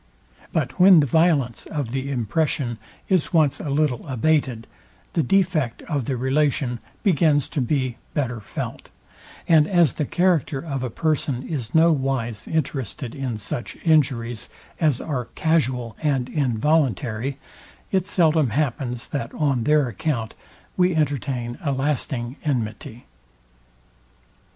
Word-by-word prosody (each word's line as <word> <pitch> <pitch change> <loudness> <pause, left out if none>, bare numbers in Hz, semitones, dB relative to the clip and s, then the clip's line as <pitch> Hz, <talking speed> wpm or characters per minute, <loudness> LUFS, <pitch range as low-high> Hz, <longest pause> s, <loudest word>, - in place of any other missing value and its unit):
But 145 0 -2
when 185 -1 +8
the 145 - +4
violence 145 -5 +2
of 145 -7 -3
the 135 +1 -3
impression 125 -1 -1 0.3
is 185 -1 +1
once 155 -4 +3
a 150 - -4
little 140 -1 0
abated, 130 -3 +1 0.5
the 165 - +2
defect 160 -6 +1
of 145 -7 -2
the 130 0 -1
relation 130 -1 +1 0.2
begins 155 - +3
to 145 - -1
be 130 -1 -1 0.2
better 125 -5 -1
felt; 105 - -6 0.6
and 155 -2 +5
as 170 - +3
the 150 - -2
character 175 -4 +1
of 135 -3 -4
a 125 - -2
person 140 -2 -1
is 130 -7 -4
no 165 +1 +6
wise 130 -7 -2
interested 135 -5 -3
in 130 -5 -3
such 105 +3 -5
injuries 125 -8 +1 0.3
as 150 -6 +2
are 130 -6 -3
casual 130 -8 0
and 135 -5 0
involuntary, 130 - 0 0.5
it 190 -1 +1
seldom 160 -7 +3
happens 125 -1 -2
that 120 -5 -3
on 135 -6 +1
their 150 -3 +4
account, 115 -1 -2 0.4
we 180 -1 +3
entertain 135 -5 -1
a 145 - 0
lasting 135 -2 -1
enmity. 125 -2 -3
140 Hz, 130 wpm, -23 LUFS, 120-155 Hz, 0.6 s, when